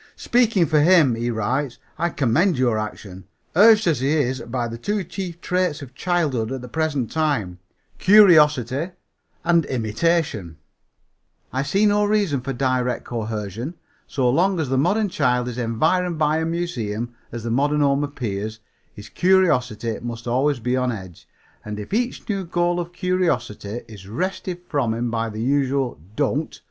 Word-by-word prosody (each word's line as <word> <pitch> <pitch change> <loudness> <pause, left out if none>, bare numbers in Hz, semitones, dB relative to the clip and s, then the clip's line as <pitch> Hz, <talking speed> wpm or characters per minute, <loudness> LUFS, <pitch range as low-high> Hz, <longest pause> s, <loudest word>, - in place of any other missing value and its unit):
"Speaking 230 -7 +2
for 155 -1 +2
him," 160 -5 +5
he 115 +1 -2
writes, 120 +4 -1 0.2
"I 170 - +1
commend 150 - +2
your 120 -4 +2
action. 100 -3 -7 0.3
Urged 215 +3 +6
as 160 -7 +2
he 135 +2 0
is 130 -4 +1
by 120 0 -3
the 115 0 -7
two 205 - -1
chief 175 -1 -6
traits 180 -5 -1
of 130 -2 -11
childhood, 145 -8 0
at 135 -1 -4
the 125 - -8
present 145 -3 -1
time 140 - -1 0.4
curiosity 160 - +5 0.5
and 170 -1 +3
imitation 115 - -1 1.0
I 130 - 0
see 195 +9 +1
no 205 0 +3
reason 205 -10 +1
for 135 +2 -4
direct 130 -1 -1
coercion. 110 - -4 0.3
So 130 -3 0
long 175 +8 +2
as 150 -5 -1
the 135 - +1
modern 205 +8 +2
child 125 -6 +1
is 125 0 -5
environed 160 +10 +1
by 155 0 +2
a 160 - -1
museum, 120 -10 -3 0.2
as 115 -1 -6
the 115 - -3
modern 145 +4 +2
home 140 0 +2
appears, 110 -6 -4 0.3
his 105 - -11
curiosity 125 - +1
must 120 0 -6
always 130 +3 +1
be 125 +2 -1
on 125 -1 0
edge, 95 -6 -9 0.4
and 105 0 -6
if 105 - -7
each 245 +3 -1
new 200 -4 -1
goal 175 0 0
of 175 0 -4
curiosity 145 - -1
is 100 -4 -12
wrested 180 - -3
from 125 -7 0
him 120 0 -2
by 115 -1 -1
the 110 +1 -5
usual 135 - 0 0.2
'Don't!' 145 +1 -1
135 Hz, 160 wpm, -22 LUFS, 115-170 Hz, 1.0 s, Urged